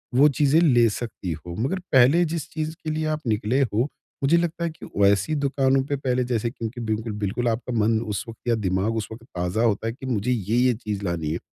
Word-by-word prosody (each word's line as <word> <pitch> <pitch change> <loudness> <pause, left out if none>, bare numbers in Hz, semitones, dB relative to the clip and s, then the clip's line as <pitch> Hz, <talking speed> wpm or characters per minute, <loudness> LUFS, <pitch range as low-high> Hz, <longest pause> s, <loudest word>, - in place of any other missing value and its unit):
वो 140 +4 +7
चीज़ें 145 +2 +3
ले 120 -8 +5
सकती 105 -5 -5
हो, 85 +2 -8
मगर 135 +11 0
पहले 135 +6 +6
जिस 165 -2 -3
चीज़ 155 0 -3
के 160 - -3
लिए 155 0 -1
आप 155 0 -1
निकले 110 +4 +1
हो 115 -3 +1 0.4
मुझे 150 +5 +4
लगता 170 0 -1
है 170 - 0
कि 155 - -12
वैसी 100 +7 +3
दुकानों 135 -2 +2
पे 145 - -1
पहले 130 -2 0
जैसे 120 -2 -1
क्योंकि 115 0 -6
बिल्कुल 110 0 -2
बिल्कुल 110 +5 -1
आपका 115 +2 -2
मन 110 +1 +3
उस 105 -4 -3
वक़्त 115 +1 -12
या 120 - +3
दिमाग 100 +1 0
उस 110 - -2
वक़्त 110 +1 -9
ताज़ा 90 +5 0
होता 110 -1 +1
है 115 - -2
कि 130 - -10
मुझे 125 -2 0
ये-ये 120 +3 +2
चीज़ 105 -3 -5
लानी 85 -4 -2
है। 85 - -2
120 Hz, 225 wpm, -24 LUFS, 105-135 Hz, 0.4 s, वो